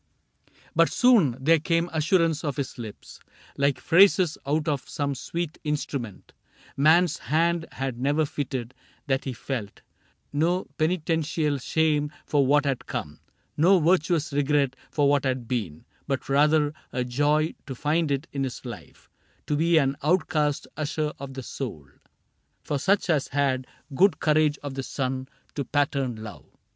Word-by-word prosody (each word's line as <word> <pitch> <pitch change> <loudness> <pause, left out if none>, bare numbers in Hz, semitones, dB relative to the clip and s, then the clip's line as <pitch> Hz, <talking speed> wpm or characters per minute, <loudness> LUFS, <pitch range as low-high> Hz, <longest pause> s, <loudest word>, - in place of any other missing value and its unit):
4 - - -46
CAPTAIN - - -40
CRAIG - - -28
But - - +5
soon 210 - +4
there 165 +2 +5
came 165 +2 +1
assurance 165 0 +2
of 145 -4 -2
his 140 -3 -4
lips, 110 -3 -9 0.4
Like 140 -2 +1
phrases 185 -2 +5
out 150 +2 0
of 145 -4 -2
some 140 -1 -2
sweet 165 +4 -4
instrument 140 -8 -4 0.4
Man's 160 +3 +4
hand 165 +2 +1
had 130 -3 -4
never 145 +4 +2
fitted, 130 -4 -4 0.3
that 135 -2 0
he 135 - -3
felt 115 -5 -5 0.3
" - - -42
No 180 +3 +1
penitential 160 -3 0
shame 150 +1 +1
for 140 -3 +2
what 145 +2 +4
had 135 -3 -2
come, 75 0 -5 0.4
No 180 +5 +5
virtuous 165 -2 +2
regret 140 -1 +1
for 145 -2 +2
what 140 -1 +3
had 130 -3 -2
been, 100 -12 -3
— - - -37
But 135 -2 -2
rather 150 +1 +3 0.2
a 125 - -1
joy 145 +5 +1
to 135 - -5
find 155 +4 0
it 140 +2 -1
in 140 -1 -2
his 130 0 -5
life 120 -4 -10 0.4
To 150 - 0
be 165 +2 +3
an 135 -2 +2
outcast 155 -2 +1
usher 155 0 -2
of 135 -1 -8
the 135 - -6
soul 115 - -6 0.8
For 145 - -2
such 195 +6 +2
as 155 -6 +1
had 135 -2 0 0.3
good 175 +1 +3
courage 150 -1 +2
of 145 -2 -5
the 135 - -3
Sun 130 0 -3 0.3
To 140 - -2
pattern 140 -2 0
Love." 110 -1 -10
145 Hz, 160 wpm, -26 LUFS, 135-160 Hz, 0.8 s, But